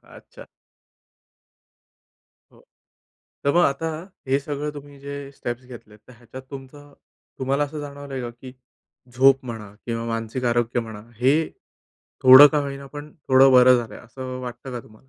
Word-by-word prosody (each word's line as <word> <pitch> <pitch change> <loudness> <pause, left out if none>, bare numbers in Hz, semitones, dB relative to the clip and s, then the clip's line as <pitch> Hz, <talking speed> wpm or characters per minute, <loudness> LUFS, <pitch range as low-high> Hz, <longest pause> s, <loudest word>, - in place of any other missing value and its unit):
अच्छा. - - -15 2.0
हो, - - -22 0.8
तर 140 - +3
मग 175 0 +5
आता 140 +4 0 0.4
हे 135 +1 +3
सगळं 145 +1 -4
तुम्ही 145 -1 -11
जे 140 +1 -7 0.2
स्टेप्स 120 -2 -6
घेतलेत, 110 -4 -13
तर - - -13
ह्याच्यात 120 +2 -12
तुमचं 145 +1 -11 0.5
तुम्हाला 135 +2 +1
असं 150 +1 -7
जाणवलं 145 -1 -9
आहे 130 - -4
का? 120 - -5
की 125 +2 -13 0.6
झोप 135 +1 +4
म्हणा 110 -4 -8
किंवा 115 -1 -3
मानसिक 115 +2 -4
आरोग्य 120 0 +1
म्हणा, 110 -2 -8 0.2
हे 140 +7 +2 0.7
थोडं 130 +3 +11
का 150 - 0
होईना 140 0 -6
पण 145 +2 -10 0.2
थोडं 135 +1 +6
बरं 125 0 +7
झालंय, 110 -3 -7
असं 130 +2 -8
वाटतं 125 +1 -8
का 120 - -5
तुम्हाला? 110 +4 -21
130 Hz, 150 wpm, -23 LUFS, 120-140 Hz, 2.0 s, थोडं